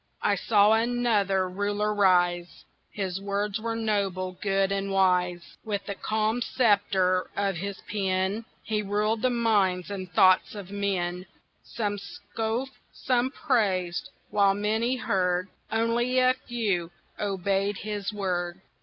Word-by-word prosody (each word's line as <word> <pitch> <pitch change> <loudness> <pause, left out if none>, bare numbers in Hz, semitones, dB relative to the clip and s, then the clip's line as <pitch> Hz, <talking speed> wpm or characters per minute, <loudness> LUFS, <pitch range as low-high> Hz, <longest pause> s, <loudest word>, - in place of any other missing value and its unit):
I - - +3
saw 210 -1 +4
another 220 -5 +2
Ruler 205 +3 -1
rise 175 -3 +2 0.2
His 190 -2 -4
words 200 +1 -2
were 230 0 -2
noble, 200 -4 -1
good, 195 -1 +1
and 195 0 -1
wise; 180 -2 +1
With 205 -2 -3
the 200 - -3
calm 215 +3 -1
sceptre 200 -6 +2
of 195 -3 0
his 195 +3 -5
pen 195 +1 -1 0.2
He 215 -1 -1
ruled 210 +2 0
the 255 - +3
minds 205 -6 +1
and 185 -2 -6
thoughts 185 +3 +4
of 200 -2 -8
men; 185 -3 -2 0.3
Some 205 -3 -3
scoffed, 225 +5 -4 0.2
some 250 -1 0
praised 200 - 0 0.2
while 200 -1 +4
many 220 +5 0
heard, 185 -5 0 0.2
Only 230 +3 +1
a 255 0 +5
few 215 -9 -2 0.3
obeyed 195 0 0
his 210 -2 -4
word. 180 -3 -2
200 Hz, 125 wpm, -27 LUFS, 185-220 Hz, 0.3 s, a